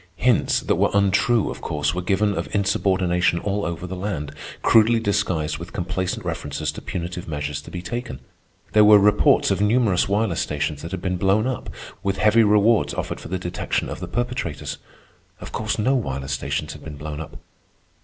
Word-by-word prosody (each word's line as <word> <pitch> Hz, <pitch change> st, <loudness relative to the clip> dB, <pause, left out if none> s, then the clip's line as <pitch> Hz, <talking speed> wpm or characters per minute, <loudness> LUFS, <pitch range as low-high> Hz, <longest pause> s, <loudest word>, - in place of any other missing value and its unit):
Hints 120 Hz, +6 st, +2 dB
that -, -, 0 dB
were -, -, +3 dB
untrue, 100 Hz, +3 st, +3 dB
of -, -, -9 dB
course, 75 Hz, 0 st, -1 dB
were 90 Hz, -, -2 dB
given 100 Hz, +3 st, +1 dB
of -, -, -3 dB
insubordination 95 Hz, -3 st, +2 dB
all 100 Hz, +3 st, -2 dB
over 85 Hz, +1 st, -4 dB
the 95 Hz, +1 st, -5 dB
land, 90 Hz, -7 st, -4 dB, 0.3 s
crudely 115 Hz, +1 st, +5 dB
disguised 95 Hz, -8 st, -1 dB
with 85 Hz, -, -9 dB
complacent 95 Hz, 0 st, -3 dB
references 75 Hz, +1 st, -3 dB
to -, -, -9 dB
punitive 85 Hz, 0 st, -5 dB
measures 75 Hz, -2 st, -3 dB
to -, -, -12 dB
be 90 Hz, -1 st, -6 dB
taken. 120 Hz, +3 st, -5 dB, 0.5 s
There 105 Hz, -, +6 dB
were 105 Hz, 0 st, +8 dB
reports 105 Hz, +1 st, +4 dB
of -, -, 0 dB
numerous 105 Hz, -4 st, +2 dB
wireless 100 Hz, -3 st, +1 dB
stations 75 Hz, 0 st, -2 dB
that 85 Hz, -, -6 dB
had 95 Hz, 0 st, -5 dB
been 90 Hz, -1 st, -1 dB
blown 95 Hz, +5 st, +2 dB
up, 130 Hz, -2 st, -3 dB, 0.3 s
with 95 Hz, -1 st, -1 dB
heavy 105 Hz, +4 st, +5 dB
rewards 105 Hz, +2 st, +3 dB
offered -, -, -4 dB
for -, -, -9 dB
the 95 Hz, -, -2 dB
detection 90 Hz, -1 st, -2 dB
of -, -, -6 dB
the -, -, -5 dB
perpetrators. 120 Hz, -, -3 dB, 0.6 s
Of -, -, -9 dB
course 110 Hz, 0 st, -2 dB
no 115 Hz, +5 st, +2 dB
wireless 70 Hz, -, -2 dB
stations 65 Hz, -, -2 dB
had -, -, -12 dB
been 75 Hz, -3 st, -8 dB
blown 75 Hz, 0 st, -6 dB
up. 80 Hz, -1 st, -9 dB
95 Hz, 185 wpm, -23 LUFS, 80-105 Hz, 0.6 s, were